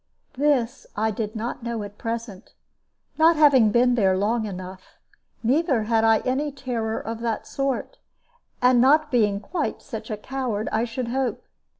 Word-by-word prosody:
This 265 -4 0
I 220 +1 +1
did 215 0 -4
not 230 +3 -4
know 235 -2 -3
at 205 0 -10
present, 230 -3 -5 0.7
not 330 +1 +6
having 280 -7 +6
been 245 +3 +3
there 190 -5 +2
long 220 +3 0
enough; 185 -1 -9 0.5
neither 265 -1 +2
had 225 0 +1
I 225 -1 +4
any 280 +4 -1
terror 240 -5 -3
of 225 0 -5
that 230 -1 -2
sort, 275 - -3 0.6
not 265 +5 +5
being 210 -5 +2
quite 275 - -3
such - - -7
a 215 - -3
coward, 235 -2 -3
I 220 +2 +1
should 240 +1 -4
hope. 260 0 -2
235 Hz, 155 wpm, -24 LUFS, 215-265 Hz, 0.7 s, not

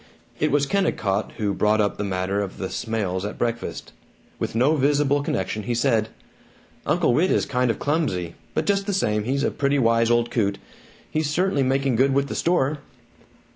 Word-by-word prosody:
It - - +2
was 145 0 +2
Kennicott 110 - 0
who 105 -2 0
brought 105 +2 +2
up 105 -1 +1
the 105 - -2
matter 95 +1 -1
of 100 -2 -5
the 95 - -4
Smails 100 -5 -2
at 105 - -5
breakfast. 120 0 -3 0.5
With - - -3
no 130 +7 +3
visible 145 0 +2
connection 110 -5 -2
he 120 +3 -2
said, 115 -3 +1 0.8
"Uncle 155 -4 +2
Whit 170 +9 +3
is - - +2
kind 125 0 0
of 115 - 0
clumsy, 125 - -1 0.2
but 155 - 0
just 200 +2 +1
the 200 - 0
same, 105 - 0
he's 135 +3 0
a - - +1
pretty 140 0 0
wise 115 -2 +3
old 120 0 +2
coot. 100 -4 0 0.5
He's 155 -1 0
certainly 175 -1 +1
making 135 -1 +1
good 135 +2 +3
with 140 0 +1
the - - -4
store." 155 -4 +1
125 Hz, 185 wpm, -23 LUFS, 105-145 Hz, 0.8 s, no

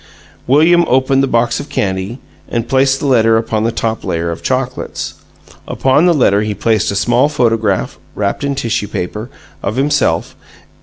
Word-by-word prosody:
William 165 +6 +5
opened 130 +1 +2
the 135 - +1
box 120 -1 +1
of 145 - -8
candy 95 +4 -2 0.3
and 115 -1 -2
placed 135 +1 +2
the - - -4
letter 115 -4 +4
upon 110 -1 -1
the 115 - +1
top 115 0 -3
layer 85 0 -2
of 85 - -6
chocolates. 130 0 -3 0.5
Upon 135 +6 +2
the 175 - +4
letter 105 -7 +3
he 105 -1 -2
placed 110 -1 +1
a 100 - -2
small 120 +7 +2
photograph 115 -8 0 0.2
(wrapped 100 +7 -2
in 140 0 -1
tissue 115 -5 -2
paper) 105 +6 -5 0.3
of 100 - -3
himself. 140 +3 0
120 Hz, 165 wpm, -15 LUFS, 105-135 Hz, 0.5 s, William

